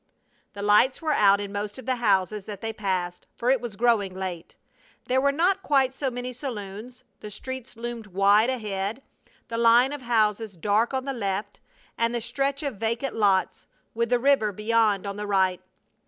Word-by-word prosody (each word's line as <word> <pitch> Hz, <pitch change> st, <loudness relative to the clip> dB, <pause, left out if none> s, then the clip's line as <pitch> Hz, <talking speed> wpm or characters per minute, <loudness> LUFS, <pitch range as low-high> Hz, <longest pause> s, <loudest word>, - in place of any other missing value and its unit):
The 205 Hz, -1 st, -6 dB
lights 210 Hz, +6 st, +4 dB
were 315 Hz, -2 st, -1 dB
out 200 Hz, -5 st, +5 dB
in 200 Hz, -1 st, -5 dB
most 205 Hz, +2 st, -4 dB
of 260 Hz, -, -10 dB
the 255 Hz, -1 st, 0 dB
houses 205 Hz, -2 st, +1 dB
that 205 Hz, -3 st, -7 dB
they 225 Hz, 0 st, -3 dB
passed, 185 Hz, -4 st, -3 dB
for 245 Hz, +2 st, +1 dB
it 265 Hz, -3 st, +2 dB
was 235 Hz, -4 st, -6 dB
growing 215 Hz, -5 st, +1 dB
late. 185 Hz, -3 st, -6 dB, 0.5 s
There 260 Hz, +1 st, +2 dB
were 280 Hz, +1 st, +3 dB
not 360 Hz, +6 st, +1 dB
quite 270 Hz, -5 st, +2 dB
so 270 Hz, -1 st, -1 dB
many 245 Hz, 0 st, -5 dB
saloons. 230 Hz, -2 st, -7 dB, 0.2 s
The 210 Hz, -, -8 dB
streets 260 Hz, +3 st, -7 dB
loomed 235 Hz, -1 st, -6 dB
wide 200 Hz, +4 st, +4 dB
ahead, 215 Hz, 0 st, -3 dB, 0.4 s
the 230 Hz, 0 st, -3 dB
line 235 Hz, +4 st, +5 dB
of 290 Hz, -, -6 dB
houses 220 Hz, -4 st, 0 dB
dark 210 Hz, +6 st, +1 dB
on 260 Hz, 0 st, -2 dB
the 275 Hz, -, -2 dB
left, 205 Hz, -3 st, -3 dB, 0.4 s
and 230 Hz, +1 st, +1 dB
the -, -, 0 dB
stretch 275 Hz, +5 st, -2 dB
of 275 Hz, -7 st, -3 dB
vacant 230 Hz, +5 st, -2 dB
lots, 200 Hz, -3 st, +1 dB, 0.3 s
with 235 Hz, 0 st, -1 dB
the 245 Hz, -, +3 dB
river 250 Hz, -4 st, +3 dB
beyond 210 Hz, -1 st, +1 dB
on 200 Hz, 0 st, -4 dB
the 210 Hz, 0 st, -4 dB
right. 190 Hz, -2 st, +1 dB
225 Hz, 185 wpm, -25 LUFS, 200-250 Hz, 0.5 s, out